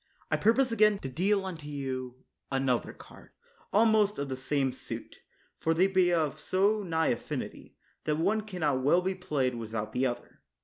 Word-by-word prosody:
I - - +4
pur 225 +2 +4
pose 265 -2 +2
again 215 -2 +4
to 135 - -4
deal 190 +8 +1
unto 165 -6 -6
you 130 -3 -5 0.3
another 135 -3 0
card, - - -16 0.4
almost 215 0 +4
of 140 -1 -3
the 130 - -2
same 135 0 0
suit; - - -7 0.4
for 165 0 +1
they 180 +3 +4
be 185 -2 +3
of 155 -3 0
so 200 +6 +2
nigh 160 -4 0
affinity, 120 - -4 0.3
that 150 -1 +1
one 200 +7 +1
can 200 -4 -8
not 145 -4 +2
well 170 +7 +3
be 190 +1 0
played 145 -8 -1
without 110 -2 -4
the 130 +1 +2
other. 120 - -7
160 Hz, 180 wpm, -29 LUFS, 130-195 Hz, 0.4 s, I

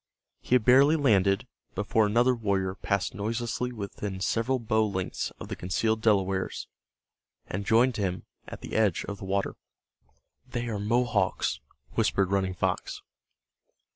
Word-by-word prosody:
He 125 - +1
had 120 -4 +2
barely 135 +5 +6
landed 100 - +3 0.3
before 105 +1 +2
another 120 +4 +3
warrior 100 -5 -1
passed 100 0 -1
noiselessly 115 +4 -2
within 100 -3 -5
several 115 +6 0
bow 110 -2 +1
lengths 95 -3 -3
of - - -7
the - - -4
concealed 110 +5 0
Delawares, 95 -4 +1 0.8
and 100 +2 -5
joined 120 +2 +4
him 95 -3 -2 0.2
at - - -8
the - - -8
edge 105 -6 +2
of 100 -1 -6
the - - -7
water. 100 +1 -1 0.9
"They 120 -1 -4
are 105 -3 -3
Mohawks," 110 -2 +1 0.3
whispered 95 -1 +1
Running 95 -2 0
Fox. - - -2
105 Hz, 140 wpm, -28 LUFS, 95-120 Hz, 0.9 s, barely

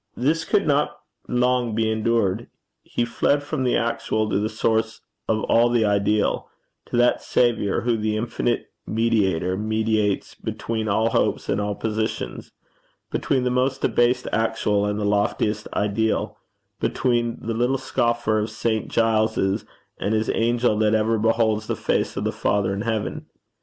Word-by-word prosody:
This 155 +6 +1
could 205 -2 +2
not 150 +1 +1 0.3
long 125 -2 +1
be 110 0 +1
endured. 110 -1 0 0.3
He 120 - -2
fled 145 +4 +1
from 140 -2 -2
the 125 - +2
actual 115 -2 -1
to - - +2
the 105 +1 -1
source 110 0 0 0.3
of 110 0 0
all 120 +1 +4
the 120 -2 +2
ideal 105 0 +1 0.4
to - - -2
that 120 0 +3
Saviour 115 -5 +1
who, 120 -1 +1
the 110 0 -1
infinite 120 +1 -2 0.2
mediator, 100 -6 +1
mediates 110 -1 0
between 110 -1 -4
all 110 +2 +2
hopes - - 0
and 100 - +1
all 105 0 -2
positions; 110 0 -3 0.6
between 130 -2 0
the 125 - +1
most 130 +1 0
debased 120 +1 +2
actual 105 -2 +1
and 105 0 -1
the 105 - -1
loftiest 105 +1 0
ideal; 105 +2 0 0.4
between 120 -2 0
the 115 - -3
little 120 +4 +1
scoffer 120 -4 0
of 105 +1 -2
St. 110 0 -1
Giles's 110 -2 +1 0.3
and 105 +2 0
his 110 0 0
angel 115 -1 +1
that 110 0 +3
ever 110 +1 +1
beholds 110 -1 +1
the - - -1
face - - -1
of - - -1
the - - 0
Father 100 -1 0
in 100 - -3
heaven. 110 -2 -3
110 Hz, 155 wpm, -23 LUFS, 105-120 Hz, 0.6 s, all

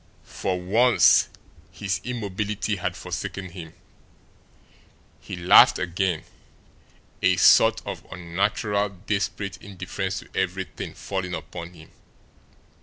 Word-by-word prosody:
For 90 -1 -3
once 115 +7 +4 0.4
his 95 -2 -3
immobility 105 -3 -3
had 90 - -3
forsaken 95 -1 -5
him. 85 -3 -10 1.5
He - - -7
laughed 90 0 +7
again 90 -1 -1 1.0
a - - +4
sort - - +5
of - - -6
unnatural, 100 +4 -1
desperate 100 0 -3
indifference 95 0 -5
to - - -17
everything 95 0 -3
falling 95 -2 -4
upon 85 0 -8
him. 80 -1 -15
95 Hz, 100 wpm, -24 LUFS, 90-100 Hz, 1.5 s, laughed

